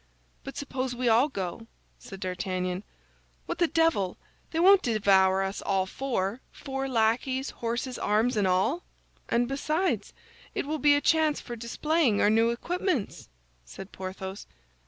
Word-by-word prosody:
"But - - -8
suppose 260 -2 -3
we 250 0 -1
all 235 +6 +4
go," 195 -1 -5 0.3
said 195 -1 -10
D'Artagnan; 185 0 -2 0.6
"what - - -4
the 345 - +4
devil! 325 - +1 0.3
They 325 - -2
won't 385 +2 +7
devour 195 - +3
us 195 +1 -3
all 195 -1 +1
four, 230 0 -2
four 270 -1 -4
lackeys, 255 +3 +1
horses, 240 +2 -3
arms, 220 +4 +1
and 205 -3 +2
all!" 195 - +1 0.5
"And 240 +1 +2
besides, 305 +7 -1 0.4
it - - -1
will 305 +2 -2
be 290 +1 +5
a 290 - +1
chance 315 -1 +3
for 240 - -7
displaying 240 +1 +1
our 205 - +4
new 225 +1 +4
equipments," 325 - -2 0.3
said 185 - -10
Porthos. 190 +1 -7
235 Hz, 145 wpm, -28 LUFS, 195-280 Hz, 0.6 s, won't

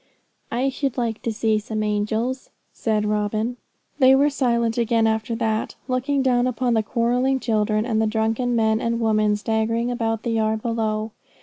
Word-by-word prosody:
'I 255 +3 +1
should 270 -1 -3
like 230 -3 -2
to 230 - -2
see 220 0 +1
some 215 0 -3
angels,' 220 +5 -1 0.2
said 215 -2 0
Robin. 215 +3 -1 0.4
They 265 -1 +7
were 285 +2 +3
silent 235 -4 +1
again 230 -1 +2
after 220 +1 0
that, 220 -1 -1
looking 265 +2 0
down 250 -1 +2
upon 250 0 0
the 220 - +3
quarrelling 245 +4 +1
children, 215 -2 0
and 220 -3 0
the 220 - +2
drunken 225 +3 0
men 220 -1 +2
and 230 0 -1
women 215 -2 +2
staggering 225 +3 -1
about 225 -2 -2
the 235 - -1
yard 220 -1 0
below. 220 -2 -1
225 Hz, 170 wpm, -22 LUFS, 220-245 Hz, 0.4 s, They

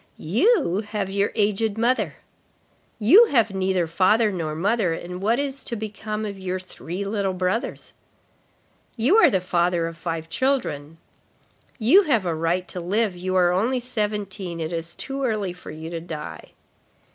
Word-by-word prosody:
—"You 230 - +2
have 205 -2 -3
your 200 +1 +1
aged 210 +1 +1
mother."—" 240 +3 +1 0.8
You 350 - +7
have 230 - +2
neither 190 -2 +1
father 205 +6 +3
nor 160 -5 -3
mother, 195 0 +1
and 180 +2 -7
what 225 +4 +2
is 275 -1 -3
to 235 - -3
become 215 0 -4
of 200 -2 -6
your 185 0 -3
three 185 +1 -6
little 200 -2 -1
brothers?"—"You 225 - -3
are 350 -8 +7
the 190 - +1
father 175 -1 +1
of 165 0 -5
five 165 -1 -4
children."—"You 220 - -1
have 240 - +1
a 170 - 0
right 165 +3 -1
to 180 - -5
live, 200 +3 0
you 185 +1 -3
are 180 -1 +4
only 230 +8 +1
seventeen, 210 -7 -3
it 160 +1 -3
is 165 0 -5
too 275 0 -4
early 210 -7 -1
for 180 - -12
you 160 +2 -7
to 170 - -3
die." 160 -3 -7
195 Hz, 155 wpm, -23 LUFS, 175-225 Hz, 0.8 s, You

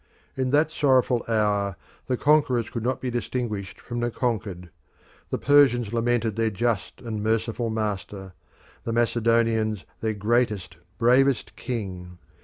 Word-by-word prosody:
In 130 -1 -1
that 150 +3 +3
sorrowful 130 -5 +2
hour 105 -4 +1 0.3
the 125 - 0
conquerors 135 -6 +2
could 115 - -3
not 125 +2 -1
be 125 - -2
distinguished 115 -5 -3
from 120 0 -5
the 120 0 0
conquered; 100 -8 -3 0.6
the - - -1
Persians 125 -6 +4
lamented 115 -2 +1
their 115 0 +1
just 110 -1 -2
and 110 -3 -4
merciful 115 +2 0
master; 100 -3 -4 0.5
the 115 - -3
Macedonians 115 -2 +1
their 110 -1 -1
greatest, 105 -5 0 0.2
bravest 130 +2 +3
king. 90 -7 -5
115 Hz, 130 wpm, -25 LUFS, 105-125 Hz, 0.6 s, Persians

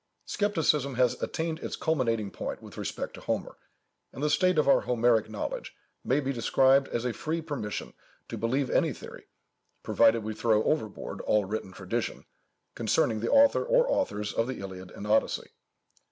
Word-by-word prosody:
_ - - -52 0.3
Scepticism 155 - +1
has 125 0 +2
attained 160 0 -2
its - - -4
culminating 115 -9 0
point - - -5
with - - -12
respect - - -4
to - - -10
Homer, - - -3 0.5
and 135 - -7
the 150 - +2
state 185 +1 +3
of 150 - +3
our 140 - +5
Homeric 115 -3 +2
knowledge 110 -2 -5 0.3
may 135 +3 +2
be 135 -1 -2
described 135 +3 +3
as 120 +1 -3
a 125 - 0
free 160 +7 -2
permission 145 -10 -5 0.3
to - - -5
believe 125 +5 0
any - - +2
theory, - - -11 0.6
provided 115 -1 +4
we 110 +1 -3
throw 110 -1 +2
overboard 110 -10 -2
all 105 -2 +2
written 100 -1 -4
tradition, 95 +5 -4 0.5
concerning 110 - +1
the 115 - -2
author 280 0 +5
or - - +3
authors 105 - -1
of 115 - 0
the 130 - -4
Iliad 95 -1 -8
and 100 - -9
Odyssey. 110 +1 +1
120 Hz, 170 wpm, -28 LUFS, 110-150 Hz, 0.6 s, our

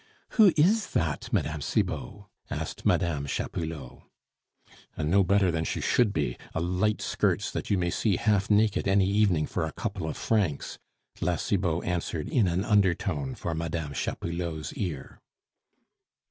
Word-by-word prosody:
"Who 215 -5 +6
is 205 +8 +3
that, 80 -3 -1
Mme. 75 0 0
Cibot?" 100 +7 -2 0.3
asked - - -4
Mme. 75 -4 +1
Chapoulot. 80 -3 -4 1.0
"A 80 - -2
no 95 +6 +4
better 95 0 +3
than 80 -1 -1
she - - -2
should 120 -4 +2
be, - - -2 0.2
a - - +1
light 90 +5 0
skirts - - 0
that - - -4
you 100 - +3
may 85 -1 0
see 105 +1 +1
half 100 +1 +1
naked 105 -1 +3
any 95 0 +4
evening 100 -6 +3
for - - -2
a 80 - -2
couple 90 +1 -4
of - - -5
francs," 100 -10 -1 0.4
La 90 - +1
Cibot 90 -1 0
answered 85 -3 -2
in 115 -7 +3
an 90 +3 0
undertone 90 - +1
for 85 - -3
Mme. 80 -2 -3
Chapoulot's 85 -1 -3
ear. 80 -9 -5
90 Hz, 150 wpm, -28 LUFS, 80-100 Hz, 1.0 s, Who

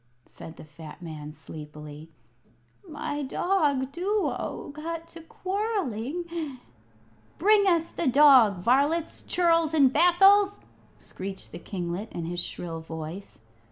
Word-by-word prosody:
said 160 - -12
the - - -10
fat 155 +1 -12
man, 155 -3 -8
sleepily. 150 0 -10 0.8
"My 295 -1 -4
dog 285 -3 0
Duo 390 -1 -2
got 330 +2 -6
to 335 - -10
quarrelling 335 - -3 0.4
" 110 0 -32
"Bring 405 +2 +4
us 335 -2 +2
the 335 - -2
dog, 255 -9 +6
varlets, 285 - +1
churls, 330 -3 +2
and 270 -4 +5
vassals!" 390 +5 +5 0.4
screeched 190 0 -8
the - - -8
kinglet, 180 +3 -5
in 170 - -4
his 175 +1 -3
shrill 170 -1 -4
voice. 160 - -8
275 Hz, 120 wpm, -27 LUFS, -, 0.8 s, dog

